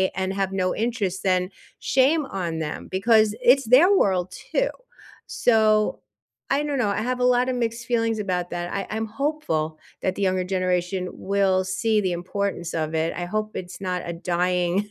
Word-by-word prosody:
and 190 0 -1
have 195 -1 -1
no 185 -1 0
interest 210 -5 -2
then, 185 -1 +1 0.3
shame 275 +4 +2
on 170 -7 -3
them, 150 -2 -5
because 215 +2 +3
it's 270 +3 +5
their 275 - +6
world 185 - +2 0.2
too. - - +2 0.6
So, 215 -2 +2 0.5
I 280 +2 +2
don't 290 -2 -2
know. 230 - +2
I 200 +1 -1
have 250 +2 -2
a 250 - +2
lotta 250 +1 +3
mixed 235 -1 -2
feelings 230 -2 0
about 180 -3 -2
that. 175 0 -4
I 200 - -3
I'm 220 +1 -2
hopeful 220 - -2 0.2
that 185 - -1
the - - -5
younger 185 -1 +1
generation 185 0 -1
will 190 -1 +1
see 210 +4 +1
the 185 -3 0
importance 175 -1 -3
of 160 -1 -2
it. 160 +1 0
I 175 - -3
hope 215 +4 -2
it's 180 +1 -8
not 180 -2 -2
a 170 - -4
dying 180 +3 0
195 Hz, 175 wpm, -24 LUFS, 180-230 Hz, 0.6 s, their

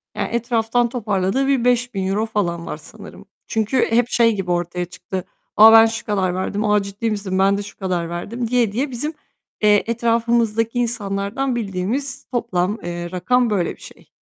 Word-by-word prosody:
Ya, - - -2
etraftan 235 0 0
toparladığı 215 +1 0
bir 265 -3 +1
€5.000 220 -4 +1
falan 175 -6 -2
var - - -5
sanırım. 155 - -12 0.2
Çünkü 225 +3 +1
hep 235 +1 +4
şey 230 -3 +3
gibi 185 -2 -3
ortaya 175 0 -1
çıktı, 180 +1 -6 0.3
"A, 220 +1 +10
ben 225 0 +9
şu 225 +1 -3
kadar 190 -4 0
verdim." 200 +3 -2
"A, 210 0 +3
ciddi 200 +3 -3
misin? 200 -3 -2
Ben 195 +1 +3
de 205 - -4
şu 205 - -12
kadar 180 -4 -2
verdim." 225 +8 -4
diye 240 -3 +2
diye 265 +6 -2
bizim, 295 +6 -2 0.5
eee, 210 -1 +4
etrafımızdaki 230 0 +1
insanlardan 230 +2 -1
bildiğimiz 240 +6 -2
toplam, 210 -5 -1
eee, 175 0 -5
rakam 240 +7 +1
böyle 185 -5 -1
bir - - -24
şey. - - -14
215 Hz, 170 wpm, -20 LUFS, 190-235 Hz, 0.5 s, A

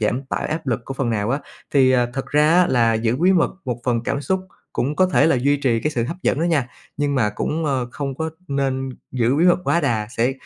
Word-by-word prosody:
giảm 115 +5 0
tải - - -3
áp 160 0 -4
lực 120 -2 0
của 135 - -6
phần 135 -3 -1
nào 105 0 -1
á. 135 - +1 0.4
Thì, 130 -2 +5
ờ, 125 -2 +3
thật 135 - -3
ra 150 +1 +3
á 180 0 +5
là 115 -6 +3
giữ 115 +2 0
bí 180 +6 +4
mật 175 -3 +3
một 125 -3 -3
phần 120 -2 +1
cảm 140 +3 -1
xúc 190 +6 -1 0.3
cũng 140 +5 -1
có 185 - +4
thể 180 - +3
là 160 - +3
duy 140 +4 +2
trì 125 -5 +1
cái 150 - -1
sự 120 -6 -1
hấp 165 +9 -4
dẫn - - +1
đó - - +1
nha, 150 -8 +1 0.3
nhưng 145 -1 0
mà 115 -6 +2
cũng, 155 +9 -2
a, 140 - +1 0.2
không 140 -2 -4
có 160 +3 -3 0.2
nên 135 -1 -1 0.2
giữ 125 0 +1
bí 165 - +3
mật 175 -1 +5
quá 170 - +2
đà 110 -8 0
sẽ 120 +3 +2
135 Hz, 265 wpm, -21 LUFS, 120-150 Hz, 0.4 s, Thì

